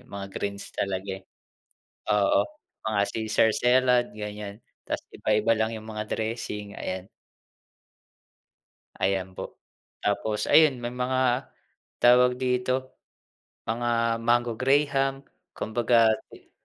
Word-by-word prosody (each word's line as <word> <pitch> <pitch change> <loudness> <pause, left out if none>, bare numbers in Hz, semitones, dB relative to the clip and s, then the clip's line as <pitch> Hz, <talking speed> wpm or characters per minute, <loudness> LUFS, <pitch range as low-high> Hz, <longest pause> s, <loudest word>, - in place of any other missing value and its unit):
mga 100 -5 -7
greens 100 +1 -4
talaga, 95 0 -2
eh. - - -22 0.9
Oo, 100 -1 +4 0.5
mga 110 -2 +1
caesar 110 0 +2
salad 125 0 +3
ganiyan, 105 0 -7 0.3
tas - - -2
iba-iba 105 +1 +2
lang 110 +1 0
'yung 110 0 -10
mga 105 -1 -4
dressing, 110 -2 -4
ayan. 95 +1 -5 1.9
Ayan 95 -1 0
po. - - -8 0.5
Tapos 105 +1 0
ayun, 155 -5 +5
may 120 0 -5
mga 125 +1 0 0.5
tawag 125 +1 +5
dito, 130 +1 -1 0.7
mga 115 0 0
mango 120 0 +2
graham, 135 0 +2 0.3
kumbaga 115 0 +3 0.2
ti - - -17
115 Hz, 105 wpm, -26 LUFS, 105-125 Hz, 1.9 s, ayun